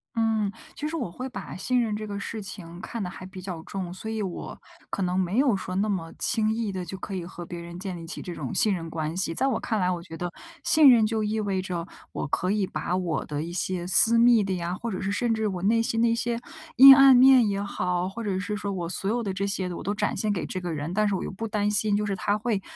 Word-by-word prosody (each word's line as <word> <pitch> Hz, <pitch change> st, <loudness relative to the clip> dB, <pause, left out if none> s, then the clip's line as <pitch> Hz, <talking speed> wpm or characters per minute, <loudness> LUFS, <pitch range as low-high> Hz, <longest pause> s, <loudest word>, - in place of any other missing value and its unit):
嗯， 220 Hz, -3 st, +1 dB, 0.2 s
其 300 Hz, -, -3 dB
实 325 Hz, -, -4 dB
我 255 Hz, -, -2 dB
会 255 Hz, +8 st, -6 dB
把 250 Hz, -, -7 dB
信 245 Hz, +7 st, +1 dB
任 220 Hz, -3 st, -1 dB
这 215 Hz, 0 st, -4 dB
个 200 Hz, -1 st, -5 dB
事 220 Hz, +2 st, -5 dB
情 175 Hz, -3 st, -9 dB
看 230 Hz, -3 st, -5 dB
得 180 Hz, -, -3 dB
还 185 Hz, -, -9 dB
比 185 Hz, 0 st, -9 dB
较 180 Hz, -3 st, -6 dB
重， 185 Hz, -2 st, -5 dB
所 185 Hz, +4 st, -7 dB
以 220 Hz, -1 st, -2 dB
我 185 Hz, -3 st, -5 dB, 0.3 s
可 195 Hz, -, -2 dB
能 180 Hz, +1 st, 0 dB
没 190 Hz, +6 st, +1 dB
有 260 Hz, -8 st, +3 dB
说， 185 Hz, -, -6 dB
那 210 Hz, +2 st, +1 dB
么 170 Hz, -5 st, -3 dB
轻 220 Hz, -2 st, +1 dB
易 225 Hz, -3 st, -2 dB
的 185 Hz, -2 st, -4 dB
就 180 Hz, -, -6 dB
可 195 Hz, -, -5 dB
以 180 Hz, -2 st, -4 dB
和 175 Hz, -1 st, -8 dB
别 175 Hz, 0 st, -7 dB
人 170 Hz, +1 st, -8 dB
建 190 Hz, -2 st, -5 dB
立 165 Hz, -, -8 dB
起 165 Hz, -, -6 dB
这 175 Hz, -, -6 dB
种 135 Hz, -5 st, -5 dB
信 215 Hz, -, +3 dB
任 165 Hz, -2 st, -5 dB
关 160 Hz, +1 st, -3 dB
系。 175 Hz, -3 st, -1 dB
在 265 Hz, -, +1 dB
我 260 Hz, -, 0 dB
看 220 Hz, -2 st, -1 dB
来， 180 Hz, -1 st, +2 dB
我 175 Hz, -2 st, -2 dB
觉 165 Hz, -, -9 dB
得 175 Hz, +1 st, -4 dB, 0.3 s
信 310 Hz, -2 st, +6 dB
任 230 Hz, -3 st, +5 dB
就 220 Hz, 0 st, -1 dB
意 215 Hz, +1 st, -1 dB
味 200 Hz, -3 st, -1 dB
着， 175 Hz, -2 st, -4 dB, 0.2 s
我 -, -, -4 dB
可 180 Hz, +6 st, 0 dB
以 205 Hz, -3 st, +1 dB
把 155 Hz, +3 st, -2 dB
我 180 Hz, -3 st, -1 dB
的 150 Hz, 0 st, -3 dB
一 170 Hz, -, -5 dB
些 180 Hz, 0 st, -2 dB
私 225 Hz, +5 st, +6 dB
密 235 Hz, -2 st, +6 dB
的 195 Hz, -1 st, -1 dB
呀， 175 Hz, 0 st, -3 dB
或 230 Hz, +3 st, -5 dB
者 185 Hz, -, -4 dB
是 195 Hz, -, -1 dB
甚 235 Hz, +3 st, +1 dB
至 220 Hz, -1 st, 0 dB
我 185 Hz, -2 st, -4 dB
内 225 Hz, +3 st, +3 dB
心 225 Hz, 0 st, -1 dB
的 235 Hz, -, +4 dB
一 230 Hz, -, +3 dB
些 235 Hz, 0 st, -1 dB, 0.4 s
阴 270 Hz, +1 st, +11 dB
暗 275 Hz, -1 st, +8 dB
面 255 Hz, -3 st, +7 dB
也 200 Hz, 0 st, -1 dB
好， 180 Hz, -2 st, -1 dB
或 225 Hz, +5 st, -6 dB
者 200 Hz, -3 st, -1 dB
是 190 Hz, +3 st, -3 dB
说 205 Hz, -1 st, -3 dB
我 175 Hz, -3 st, -3 dB
所 195 Hz, +3 st, -3 dB
有 240 Hz, +1 st, 0 dB
的 195 Hz, -3 st, -2 dB
这 200 Hz, +1 st, -2 dB
些， 190 Hz, -2 st, -2 dB
我 -, -, -6 dB
都 205 Hz, +2 st, -2 dB
展 -, -, -1 dB
现 215 Hz, -1 st, 0 dB
给 190 Hz, -, -2 dB
这 185 Hz, -, -4 dB
个 175 Hz, -1 st, -3 dB
人， 155 Hz, +2 st, -4 dB
但 210 Hz, +2 st, +2 dB
是 200 Hz, -, 0 dB
我 -, -, -3 dB
又 -, -, -4 dB
不 225 Hz, +4 st, -5 dB
担 210 Hz, -1 st, 0 dB
心 210 Hz, 0 st, +2 dB
就 210 Hz, -, -1 dB
是 200 Hz, -1 st, -1 dB
他 205 Hz, +2 st, 0 dB
会 215 Hz, -2 st, -1 dB
200 Hz, 305 characters per minute, -26 LUFS, 180-220 Hz, 0.4 s, 阴